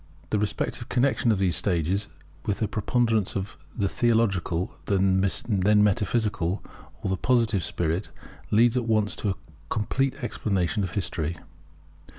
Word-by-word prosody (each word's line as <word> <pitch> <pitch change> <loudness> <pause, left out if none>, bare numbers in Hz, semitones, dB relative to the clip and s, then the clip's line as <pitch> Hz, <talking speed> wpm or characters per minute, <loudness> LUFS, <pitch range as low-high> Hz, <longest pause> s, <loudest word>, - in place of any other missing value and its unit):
The 105 - +2
respective 105 0 -2
connexion 125 -2 +2
of 105 - +2
these 95 -2 +1
states 95 +2 +1 0.4
with 105 - +1
the 110 - 0
preponderance 115 -1 +1
of 100 0 -3 0.2
the 100 - +1
theological, 100 -6 +1
then 95 -1 +3 0.6
metaphysical, 105 -3 +1 0.4
or - - -1
the 95 - 0
positive 115 -7 +2
spirit 85 +5 -1 0.4
leads 115 +3 +4
at 125 -2 +1
once 110 -2 +2
to 105 - -1
a 95 - 0 0.3
complete 135 +6 0
explanation 100 -3 0
of 95 - -2
history. 85 -4 -2
105 Hz, 135 wpm, -26 LUFS, 95-115 Hz, 0.6 s, leads